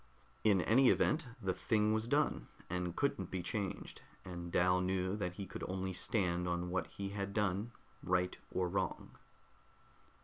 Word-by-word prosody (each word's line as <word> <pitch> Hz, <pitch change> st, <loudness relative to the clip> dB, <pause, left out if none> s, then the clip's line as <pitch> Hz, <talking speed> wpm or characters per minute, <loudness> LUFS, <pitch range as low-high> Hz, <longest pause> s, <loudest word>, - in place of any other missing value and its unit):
In 100 Hz, -4 st, +5 dB
any 125 Hz, +7 st, +5 dB
event, 150 Hz, -3 st, +3 dB
the 95 Hz, -5 st, 0 dB
thing 105 Hz, +2 st, +2 dB
was 110 Hz, +1 st, 0 dB
done, 140 Hz, -, +1 dB, 0.2 s
and 90 Hz, -1 st, -2 dB
couldn't 115 Hz, -10 st, 0 dB
be 95 Hz, -2 st, -3 dB
changed, 100 Hz, +1 st, -3 dB, 0.2 s
and 85 Hz, -2 st, -6 dB
Dal 90 Hz, +1 st, +4 dB
knew 95 Hz, +1 st, 0 dB
that 90 Hz, -4 st, -2 dB
he 100 Hz, +1 st, -5 dB
could -, -, -7 dB
only 95 Hz, 0 st, -2 dB
stand 90 Hz, -3 st, +1 dB
on 90 Hz, 0 st, -1 dB
what 90 Hz, -2 st, 0 dB
he 100 Hz, 0 st, -5 dB
had 100 Hz, 0 st, -4 dB
done, 105 Hz, +2 st, 0 dB, 0.3 s
right 90 Hz, 0 st, +1 dB
or 90 Hz, -1 st, 0 dB
wrong. 95 Hz, +1 st, -2 dB
95 Hz, 160 wpm, -36 LUFS, 90-105 Hz, 0.3 s, In